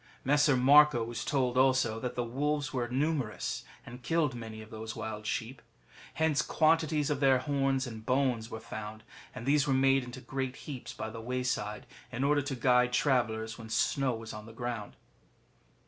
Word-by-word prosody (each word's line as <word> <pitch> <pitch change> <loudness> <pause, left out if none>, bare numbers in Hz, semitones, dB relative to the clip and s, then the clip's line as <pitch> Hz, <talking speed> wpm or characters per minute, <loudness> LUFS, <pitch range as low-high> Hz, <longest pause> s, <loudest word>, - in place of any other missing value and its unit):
[Messer 145 0 +4
Marco 145 -1 +6
was 115 0 -4
told 130 -3 +1
also 130 -4 +3
that 125 +1 -4
the 120 - 0
wolves 145 +4 -1
were 125 -2 -1
numerous, 135 -2 -1 0.2
and 125 +2 -10
killed 160 -2 +1
many 110 -2 -7
of 110 0 -11
those 110 +1 -6
wild 105 -1 -5
sheep. 120 +4 -3 0.5
Hence 160 -3 +2
quantities 155 -2 +2
of 145 - 0
their 135 -2 +5
horns 135 0 0
and 110 -3 -8
bones 125 -3 0
were 110 - -6
found, 110 0 -7 0.3
and 125 -2 -7
these 145 +1 +3
were 135 - +2
made 135 0 +4
into 125 +1 -8
great 130 0 -4
heaps 135 -5 -6
by 110 - -6
the 115 0 -7
way 125 +2 -2
side, 105 -4 -2 0.3
in 130 +1 -2
order 145 +1 +3
to 140 -1 -4
guide 125 0 +3
travellers 115 -4 +1
when 110 -1 -9
snow 130 +3 +1
was 110 0 -8
on 105 +1 -9
the 115 - -11
ground. 120 -3 -5
125 Hz, 180 wpm, -31 LUFS, 115-140 Hz, 0.5 s, Marco